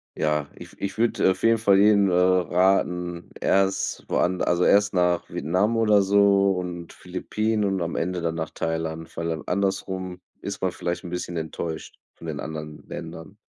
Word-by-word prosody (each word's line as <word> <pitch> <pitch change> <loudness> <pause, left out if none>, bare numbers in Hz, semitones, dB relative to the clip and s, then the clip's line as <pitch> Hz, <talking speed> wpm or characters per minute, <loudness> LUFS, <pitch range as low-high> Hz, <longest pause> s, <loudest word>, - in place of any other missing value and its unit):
ja, 75 -1 0
ich - - -11
w - - -17
ich 100 +1 -4
würde 115 -4 +3
auf 95 - -6
jeden 115 0 +5
Fall 100 -3 +4
jedem, 100 -1 +5
äh, - - 0
raten, 90 -1 +2
erst 95 0 +1
woand 90 +1 +1
also 90 0 +2
erst 105 +2 +4
nach 90 -2 +1
Vietnam 95 +7 0
oder 105 -3 +4
so 100 0 +4
und 90 -2 -5
Philippinen 105 +4 -2
und 95 -2 0
am 85 0 -3
Ende 90 +1 -2
dann 85 -1 -1
nach 80 -1 -4
Thailand, 80 0 -4
weil 85 0 -2
an 80 -2 -4
andersrum 95 -1 -2 0.2
ist - - -5
man - - +1
vielleicht 85 +1 -4
bisschen 90 0 -4
enttäuscht 80 0 -5 0.2
von 85 - -11
den 75 -3 -4
anderen 75 -1 -7
Ländern. 80 +5 -8
90 Hz, 175 wpm, -24 LUFS, 85-100 Hz, 0.2 s, jeden